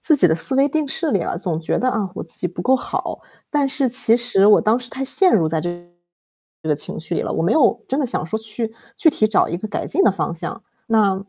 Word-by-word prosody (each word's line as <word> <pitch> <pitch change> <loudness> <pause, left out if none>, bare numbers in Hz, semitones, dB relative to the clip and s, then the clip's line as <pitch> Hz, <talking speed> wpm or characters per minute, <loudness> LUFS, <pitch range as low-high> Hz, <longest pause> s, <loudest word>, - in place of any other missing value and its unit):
自 310 - +4
己 190 - +7
的 160 - +2
思 170 +11 +6
维 275 +1 +3
定 300 0 -2
式 315 +3 -1
里 200 - +1
了， - - -3
总 170 -3 -3
觉 160 - -2
得 255 - 0
啊， 210 -6 -2
我 - - -6
自 165 - -8
己 180 - -1
不 175 0 -7
够 260 - +3
好， 260 - -4 0.3
但 290 -2 +1
是 270 0 0
其 235 -2 +3
实 235 -5 +2
我 210 - +6
当 220 +2 +2
时 250 - -8
太 270 - -4
陷 370 +7 +3
入 170 -6 +3
在 160 0 -1
这 175 - -3 0.9
这 160 - -6
个 150 - +2
情 145 - -5
绪 165 +2 -3
了， - - -4
我 - - -1
没 180 - +1
有 245 -6 +2
真 270 +3 -1
的 275 - 0
想 235 - -3
说 175 +7 -3
去 220 +1 -5 0.2
具 350 -6 +4
体 215 - +2
找 215 - +2
一 170 - -3
个 215 +5 -6
改 205 - -4
进 385 - +1
的 - - +5
方 185 -2 -3
向， 195 +7 -5 0.2
那 215 -4 +2
220 Hz, 290 characters per minute, -20 LUFS, 180-265 Hz, 0.9 s, 己